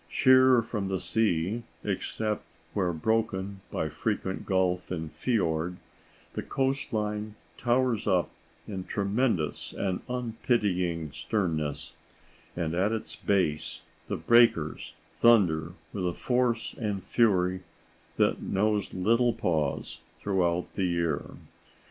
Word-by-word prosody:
Sheer 130 -2 +6
from 105 -3 -3
the 95 -1 -1
sea, 105 +1 0 0.2
except 105 +2 -2 0.3
where 95 -4 +1
broken 95 +1 -1
by - - -1
frequent 95 0 -3
gulf 90 -1 +1
and 80 -3 -4
fiord, 90 -7 0 0.6
the - - -2
coast 135 +1 -1
line 105 -1 -2 0.2
towers 120 -2 +1
up 90 -3 +2 0.4
in 95 -3 -4
tremendous 100 -4 0
and 95 -2 -1
unpitying 105 - 0
sternness, 80 -7 -2 0.6
and 85 -2 -2
at 95 +5 +2
its 110 -1 -4
base 80 -7 0 0.2
the - - -2
breakers 115 -10 +3 0.2
thunder 90 -9 +4 0.2
with 95 -3 -1
a 90 - -1
force 125 -2 0
and 105 -4 -2
fury 95 -5 +2 0.6
that - - +2
knows 105 0 0
little 115 +6 +3
pause 75 -5 -1 0.2
throughout 90 -3 +1
the 95 - 0
year. 85 -4 -1
100 Hz, 110 wpm, -28 LUFS, 90-115 Hz, 0.6 s, Sheer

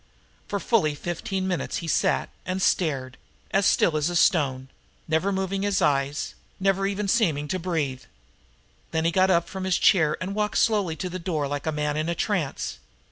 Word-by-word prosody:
For 200 - -2
fully 185 -10 +2
fifteen 180 +4 -3
minutes 180 -2 -2
he 165 - -5
sat - - +1
and 185 +1 -2
stared, 135 -9 0 0.3
as 195 0 +3
still 165 - +3
as 160 +3 +1
stone, 135 -7 +2 0.4
never 160 +5 +1
moving 190 0 -1
his 205 -1 +1
eyes, 140 0 0 0.3
never 195 0 +2
even 200 +1 -2
seeming 170 -10 +2
to 185 - -1
breathe. 150 -7 -2 0.8
Then 160 0 -1
he 165 - +3
got 185 +2 +3
up 170 -2 +3
from 190 -1 -6
his 185 -1 +2
chair 155 -5 +4
and 185 +2 -4
walked 210 0 -1
slowly 205 -7 +2
to 185 - -4
the 185 - -4
door 160 -5 -1
like 145 +2 -4
a - - +2
man 150 0 -1
in 155 +2 -1
a 170 - -1
trance. 175 -10 -2
175 Hz, 185 wpm, -25 LUFS, 150-190 Hz, 0.8 s, chair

